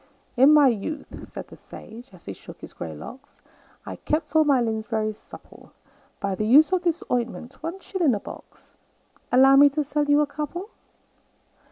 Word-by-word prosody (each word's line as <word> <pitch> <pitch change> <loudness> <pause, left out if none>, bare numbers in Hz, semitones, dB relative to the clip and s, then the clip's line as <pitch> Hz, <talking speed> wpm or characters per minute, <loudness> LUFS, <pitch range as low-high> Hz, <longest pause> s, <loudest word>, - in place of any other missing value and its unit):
"In 265 +4 +6
my 300 -2 +6
youth," 260 +6 -4
said - - -9
the - - -12
sage, 235 +3 -13
as 185 -3 -18
he 100 - -6
shook - - -14
his - - -11
grey 80 -2 -7
locks, 260 - -12 0.5
"I - - -7
kept 315 +1 -3
all 315 - +6
my 280 -4 +3
limbs 220 -2 -2
very 215 -2 -1
supple 210 - -16 0.5
By 200 -2 -2
the 215 +3 -2
use 300 +9 +6
of 370 - +2
this 345 -2 -1
ointment 245 +1 -3
one 335 +4 -5
shilling 345 - 0
a - - -3
box - - -13 0.6
Allow 270 +2 +6
me 285 +1 +8
to 300 +2 -2
sell 295 +1 -1
you 290 +1 +3
a - - +2
couple?" 305 +8 -6
275 Hz, 185 wpm, -24 LUFS, 225-305 Hz, 0.6 s, me